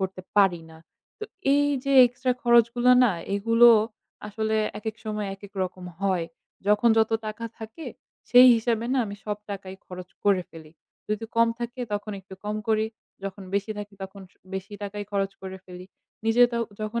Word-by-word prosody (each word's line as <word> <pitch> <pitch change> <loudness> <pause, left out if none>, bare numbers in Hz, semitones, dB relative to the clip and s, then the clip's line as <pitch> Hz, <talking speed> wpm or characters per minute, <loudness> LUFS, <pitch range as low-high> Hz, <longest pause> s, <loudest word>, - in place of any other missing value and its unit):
করতে 190 -1 -3 0.2
পারি 190 -4 +4
না। 160 - -14 0.4
তো - - -5 0.3
এই 290 0 +3 0.2
যে 275 - 0
extra 250 +1 -1
খরচগুলো 240 +1 +4
না 230 - +3 0.2
এগুলো 230 +4 +5 0.6
আসলে 220 +1 -1 0.2
একেক 215 0 -5
সময় 210 -1 -3
একেক 200 0 -14
রকম 185 0 -5 0.2
হয়। 190 -4 +1 0.4
যখন 210 +3 +4
যত 220 0 +3 0.2
টাকা 215 +2 -5
থাকে 220 +8 -9 0.4
সেই 250 +1 +9
হিসাবে 230 0 -1
না 270 - +2
আমি 200 0 -7
সব 210 -1 -2
টাকাই 190 -1 -6
খরচ 180 0 -9 0.2
করে 195 -3 +3
ফেলি। 160 -2 -13 0.4
যদি 215 +1 -2
কম 230 0 +5
থাকে 240 +2 -5
তখন 205 +1 -3
একটু 190 0 -12
কম 210 +1 -2
করি। 220 0 +2 0.4
যখন 195 0 -6
বেশি 200 +2 -1
থাকে 205 0 -8
তখন 195 +1 -9 0.3
বেশি 190 +2 -6
টাকাই 205 0 -5
খরচ 195 -1 0
করে 190 0 -6
ফেলি। 180 0 -11 0.4
নিজে 225 +2 +4
তো 235 - -1 0.2
যখন 215 +2 -2
210 Hz, 170 wpm, -25 LUFS, 195-230 Hz, 0.6 s, সেই